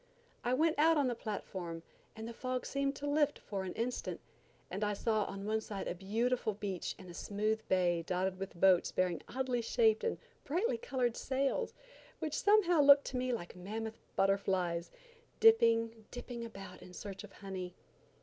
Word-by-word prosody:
I 245 +1 +2
went 315 +2 +2
out 320 +1 +6
on 285 - +3
the 250 - +1
platform, 185 -7 -5 0.3
and 220 0 -6
the 235 - -6
fog 255 +1 -3
seemed 275 0 -1
to 290 - -6
lift 295 0 +2
for 200 -2 -4
an 185 - -4
instant, 240 +2 -2 0.5
and 200 +3 -2
I 210 0 +1
saw 215 0 +1
on 195 0 -6
one 220 +1 +1
side 205 -2 -5
a - - -1
beautiful 215 +4 0
beach 195 -3 -3
and 185 - -12
a 175 - -9
smooth 215 +4 -1
bay 175 -2 +2
dotted 185 +2 -1
with 195 -3 -6
boats 185 -2 +5
bearing 180 -2 0
oddly 255 -2 -1
shaped 225 -1 +3
and 465 - 0 0.3
brightly 315 - 0
colored 245 -1 0
sails, 275 - -1 0.4
which 310 -2 -3
somehow 390 -6 +4
looked 280 0 +8
to 255 - -2
me 255 0 0
like 185 -8 -4
mammoth 220 +5 -5 0.2
butterflies, 190 -3 +1 0.5
dipping, 230 - +4
dipping 245 -1 -6
about 195 -5 -9
in 185 0 -12
search 195 +2 -7
of 205 - -12
honey. 185 -2 -6
220 Hz, 175 wpm, -34 LUFS, 190-255 Hz, 0.5 s, looked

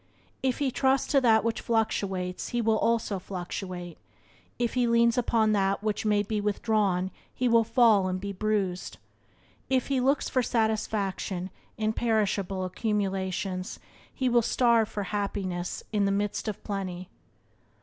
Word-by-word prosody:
If 260 -2 0
he 280 -3 0
trusts 265 +1 +2
to 275 -2 +4
that 225 -3 +4
which 230 0 -1
fluctuates 195 -5 -1
he 240 - -2
also 225 -1 +1
will - - -3
fluctuate; 180 -1 -6 0.6
if 240 -2 -1
he 250 -1 +2
leans 235 0 +4
upon 230 -3 +2
that 195 -1 +1
which 215 0 -1
may 205 -1 +3
be 210 0 -2
withdrawn 205 -3 0 0.2
he 250 - -1
will 230 -1 +5
fall 225 -4 +4
and 185 0 -2
be 200 +1 -5
bruised; 195 -3 -1 0.7
if 260 0 +1
he 270 -2 +2
looks 275 +3 +2
for 255 - +1
satisfaction 210 -5 -1 0.3
in 220 0 0
perishable 205 -5 0
accumulations 190 -1 -2 0.3
he 260 - -1
will 240 -1 +4
starve 230 -1 +3
for 205 - -3
happiness 190 -3 -3
in 205 -1 +2
the 195 - +2
midst 205 +2 -1
of 210 - -4
plenty. 185 -3 -4
210 Hz, 150 wpm, -28 LUFS, 195-230 Hz, 0.7 s, will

